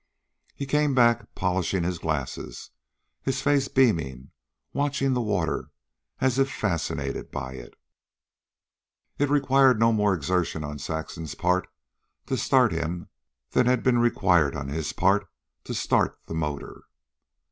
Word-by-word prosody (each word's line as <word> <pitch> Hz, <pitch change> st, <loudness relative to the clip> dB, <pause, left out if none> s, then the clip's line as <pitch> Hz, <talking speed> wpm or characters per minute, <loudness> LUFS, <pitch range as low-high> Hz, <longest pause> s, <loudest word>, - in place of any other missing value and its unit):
He 140 Hz, -, -4 dB
came 150 Hz, 0 st, +1 dB
back, 120 Hz, -3 st, +3 dB
polishing 95 Hz, 0 st, 0 dB
his 90 Hz, -1 st, -2 dB
glasses, 70 Hz, -6 st, -4 dB, 0.5 s
his 135 Hz, -, -1 dB
face 140 Hz, -2 st, +3 dB
beaming, 80 Hz, -, +1 dB, 0.4 s
watching 140 Hz, -1 st, 0 dB
the 125 Hz, -, +1 dB
water 100 Hz, -7 st, -1 dB, 0.5 s
as 130 Hz, 0 st, +1 dB
if 135 Hz, 0 st, +3 dB
fascinated 90 Hz, -7 st, -2 dB
by 65 Hz, 0 st, -5 dB
it. -, -, -11 dB, 1.4 s
It 145 Hz, 0 st, +2 dB
required 135 Hz, -4 st, +4 dB
no 115 Hz, 0 st, +5 dB
more 105 Hz, -3 st, +2 dB
exertion 85 Hz, 0 st, -1 dB
on 75 Hz, -1 st, -6 dB
Saxon's 80 Hz, 0 st, -5 dB
part 90 Hz, +1 st, +1 dB, 0.6 s
to -, -, -1 dB
start -, -, +3 dB
him 85 Hz, +2 st, -3 dB, 0.4 s
than 125 Hz, -, +3 dB
had 125 Hz, -1 st, +2 dB
been 125 Hz, -2 st, +3 dB
required 90 Hz, -10 st, +3 dB
on 70 Hz, 0 st, -4 dB
his 80 Hz, +1 st, -2 dB
part 95 Hz, 0 st, +2 dB, 0.4 s
to -, -, -4 dB
start -, -, +1 dB
the -, -, -7 dB
motor. 75 Hz, -3 st, -4 dB
95 Hz, 135 wpm, -26 LUFS, 80-130 Hz, 1.4 s, no